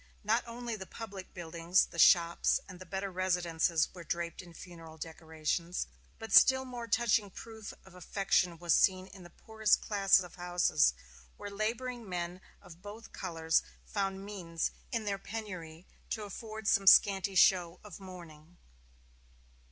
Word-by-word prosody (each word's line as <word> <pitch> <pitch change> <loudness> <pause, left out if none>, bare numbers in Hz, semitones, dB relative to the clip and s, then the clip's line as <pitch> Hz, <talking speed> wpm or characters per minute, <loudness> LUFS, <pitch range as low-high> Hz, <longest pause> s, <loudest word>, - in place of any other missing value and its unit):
Not 225 +3 +2
only 235 0 -5
the 190 -3 -8
public 200 -5 -9
buildings, 170 +1 +1
the 170 - -10
shops, 170 0 +5
and 185 -2 -11
the 185 - -11
better 195 +2 -4
residences 175 -3 +1
were 175 -2 -10
draped 170 +1 -4
in 175 -2 -14
funeral 165 -3 -11
decorations, 160 +2 -3 0.3
but 225 - -7
still 265 0 +7
more 245 -2 -7
touching 220 -2 +2
proof 220 +2 -9
of 190 - -16
affection 180 -1 0
was 170 -1 +1
seen 185 -1 +3
in 190 0 -14
the 175 - -12
poorest 220 +3 +1
class 195 -2 +4
of 180 -2 -8
houses, 175 - +2 0.4
where 205 - -7
laboring 230 +2 -3
men 175 0 -4 0.2
of 170 0 -14
both 210 +3 -11
colors 165 -3 0 0.2
found 195 -1 -3
means 175 -5 -3 0.2
in 230 -2 -2
their 200 -1 -2
penury 185 -7 -7 0.2
to 220 - -3
afford 215 +2 -7
some 195 -3 +3
scanty 195 0 +6
show 180 -1 +4
of 205 -3 -11
mourning. 175 -3 -12
185 Hz, 150 wpm, -32 LUFS, 170-210 Hz, 0.4 s, still